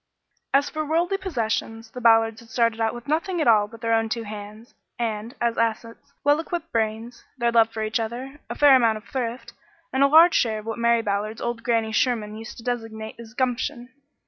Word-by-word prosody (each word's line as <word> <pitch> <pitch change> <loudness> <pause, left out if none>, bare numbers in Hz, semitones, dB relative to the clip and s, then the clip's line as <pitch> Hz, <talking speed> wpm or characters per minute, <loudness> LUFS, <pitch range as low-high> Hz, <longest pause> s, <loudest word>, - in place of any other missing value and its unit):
As 280 +1 +3
for 310 0 -3
worldly 335 +5 0
possessions, 225 - -3
the 250 - -8
Ballards 225 -1 +4
had 230 - -16
started 230 -1 +1
out 225 +1 0
with 240 +3 -10
nothing 335 +4 -1
at 310 - +1
all 210 -3 +5
but 225 +1 -14
their 230 -1 0
own 225 0 +1
two 230 +1 -2
hands, 210 +2 -9 0.2
and, 225 +1 -3
as 235 -1 0
assets, 230 +4 -2
well 290 +1 +4
equipped 340 +1 -5
brains, 225 +2 -2
their 235 -1 +1
love 230 -1 +4
for 220 -1 -4
each 215 +2 -1
other, 250 +5 -5
a - - -4
fair 290 -2 +7
amount 230 -4 +3
of 215 - -12
thrift, 240 -2 -4 0.4
and 265 - +1
a 280 - +7
large 325 +4 +7
share 220 -3 +2
of 215 - -8
what 225 +1 -4
Mary 235 0 +3
Ballard's 210 +1 -2
old 235 -1 -3
Grannie 230 -2 0
Sherman 220 -2 0
used 225 +1 -9
to 230 - -11
designate 225 -2 -5
as 230 0 -12
"gumption." 250 0 -2
230 Hz, 210 wpm, -24 LUFS, 225-255 Hz, 0.4 s, fair